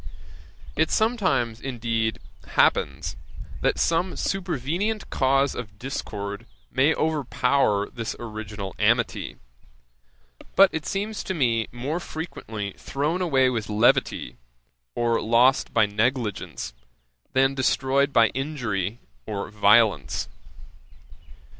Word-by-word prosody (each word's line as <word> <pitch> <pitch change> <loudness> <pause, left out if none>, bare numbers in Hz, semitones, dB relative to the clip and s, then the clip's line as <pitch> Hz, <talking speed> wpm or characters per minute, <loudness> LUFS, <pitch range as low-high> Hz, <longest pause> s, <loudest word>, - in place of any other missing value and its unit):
It - - +2
sometimes, 185 - +1
indeed, 115 -4 -1 0.3
happens, - - +1 0.5
that - - +1
some 170 +3 +1
supervenient 185 - -2
cause 135 +1 +2
of 105 -4 -7
discord 105 -4 -5 0.2
may 145 +4 +3
overpower 140 -8 +1
this 115 -2 -5
original 105 -4 -6
amity; - - +1 1.2
but 195 0 +7
it 160 -1 -3
seems 205 +2 -2
to 190 - -2
me 115 -7 +1
more 135 +8 -3
frequently 110 - -6
thrown 150 +6 -1
away 135 -7 +3
with 115 -3 -3
levity, 110 +3 +2 0.6
or 115 -1 +1
lost 120 +4 +3
by - - +4
negligence, 105 - -2 0.6
than 135 +1 +3
destroyed 135 +1 +1
by 115 -4 +5
injury 115 -8 -3 0.3
or 105 -2 -4
violence. 105 - +3
125 Hz, 100 wpm, -25 LUFS, 110-150 Hz, 1.2 s, but